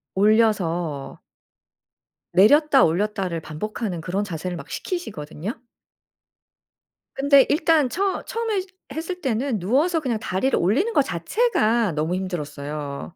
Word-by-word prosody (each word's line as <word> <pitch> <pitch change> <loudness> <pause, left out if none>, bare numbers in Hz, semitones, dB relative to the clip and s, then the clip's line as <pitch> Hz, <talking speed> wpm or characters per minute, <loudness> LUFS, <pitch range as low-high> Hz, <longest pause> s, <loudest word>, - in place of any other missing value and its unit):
올려서 190 -8 +1 1.1
내렸다 275 - +6
올렸다를 180 -1 0
반복하는 180 +4 -4
그런 185 +5 -2
자세를 180 -2 -4
막 170 - -9
시키시거든요. 215 - -5 1.5
근데 280 0 +5
일단 310 -3 +3
처 385 +6 -1
처음에 455 -4 -1 0.3
했을 340 +4 -5
때는 255 -3 -1
누워서 285 - +2
그냥 250 -7 -2
다리를 215 +6 0
올리는 270 - +1
것 290 - +5
자체가 235 - +1
너무 155 +4 -1
힘들었어요. 150 -4 -5
215 Hz, 275 characters per minute, -23 LUFS, 175-290 Hz, 1.5 s, 내렸다